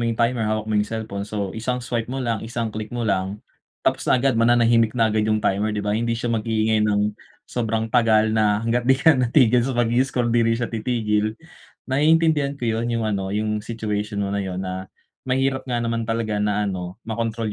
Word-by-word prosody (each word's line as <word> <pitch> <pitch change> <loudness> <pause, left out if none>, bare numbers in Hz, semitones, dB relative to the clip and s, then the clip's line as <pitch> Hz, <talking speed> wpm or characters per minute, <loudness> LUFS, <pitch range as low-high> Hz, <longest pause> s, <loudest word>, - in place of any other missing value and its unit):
yung 115 - -2
timer, 115 -2 +1
hawak 110 0 -1
mo 110 - -4
yung 105 - -2
cellphone, 105 -3 -5
so 100 -3 -3
isang 120 +3 -2
swipe 120 -2 -2
mo 130 0 -3
lang, 115 -3 -1
isang 115 -1 -4
click 110 0 -5
mo 120 0 -3
lang, 95 -1 -1 0.5
tapos - - 0
na - - +5
agad 135 +2 +2
mananahimik 115 0 +3
na 110 -2 +3
agad 110 0 +1
yung 110 0 0
timer, 105 +2 0
di 105 - -3
ba, 105 - 0
hindi 115 +1 0
siya 120 0 -2
mag-iingay 110 -1 +1
ng 105 0 +1 0.3
sobrang 115 -1 -2
tagal 110 -3 +4
na 110 0 +2
hangga't 120 +2 0
di 130 - +6
ka 160 +3 +5
natigil 125 -1 +3
sa 125 +1 -2
pag 120 -1 +1
i-scroll 125 -1 +1
di 120 - +3
rin 115 0 +2
siya 120 0 -3
titigil. 110 -2 0 0.5
Naiintindihan 150 0 +2
ko 125 - -5
yun, 115 +1 0
yung 115 -1 -1
ano, 100 -3 -1
yung 105 +1 -1
situation 105 -2 -3
mo 100 - -3
na 100 - 0
yun 95 -2 -4
na, 95 0 -5 0.4
mahirap 135 0 0
nga 120 -1 -1
naman 115 0 -2
talaga 110 -2 -1
na 105 0 +1
ano, 90 -1 -4
makontrol 115 -1 -2
115 Hz, 210 wpm, -22 LUFS, 105-120 Hz, 0.5 s, di